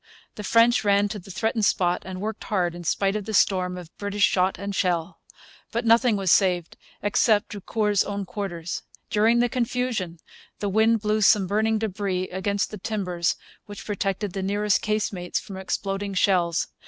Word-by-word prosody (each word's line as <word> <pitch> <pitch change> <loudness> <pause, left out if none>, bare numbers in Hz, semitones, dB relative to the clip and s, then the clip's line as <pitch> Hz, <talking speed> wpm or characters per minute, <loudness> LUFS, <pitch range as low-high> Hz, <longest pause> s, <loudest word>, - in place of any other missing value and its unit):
The 210 - -8
French 230 +3 +4
ran 205 0 +3
to 210 0 -5
the 190 - -14
threatened 220 +3 -1
spot 180 -3 +2
and 185 -1 -6
worked 215 +2 -5
hard, 180 -5 0
in 175 0 -8
spite 195 +4 0
of 210 -2 -3
the 220 0 -3
storm 185 -2 +2
of 175 -2 -11
British 205 0 -1
shot 185 -1 +3
and 200 +1 -5
shell. 175 -2 -1 0.5
But 235 +1 -2
nothing 230 0 +4
was 195 -4 +1
saved, 180 -4 +2 0.3
except 205 +1 +2
Drucour's 210 0 0
own 200 -1 -4
quarters. 175 -3 -5 0.3
During 225 +3 +4
the 245 - +3
confusion 240 -7 -2 0.4
the 205 - -2
wind 220 +2 +3
blew 215 0 0
some 205 -1 +5
burning 220 +3 +1
debris 190 -3 -2
against 200 +2 -1
the 210 - -7
timbers 180 -5 -1 0.3
which 205 -1 -9
protected 200 -1 -2
the 195 - -3
nearest 205 +1 +1
casemates 205 -4 -1
from 195 - -9
exploding 195 +1 -3
shells. 175 -3 +2
200 Hz, 170 wpm, -25 LUFS, 185-215 Hz, 0.5 s, some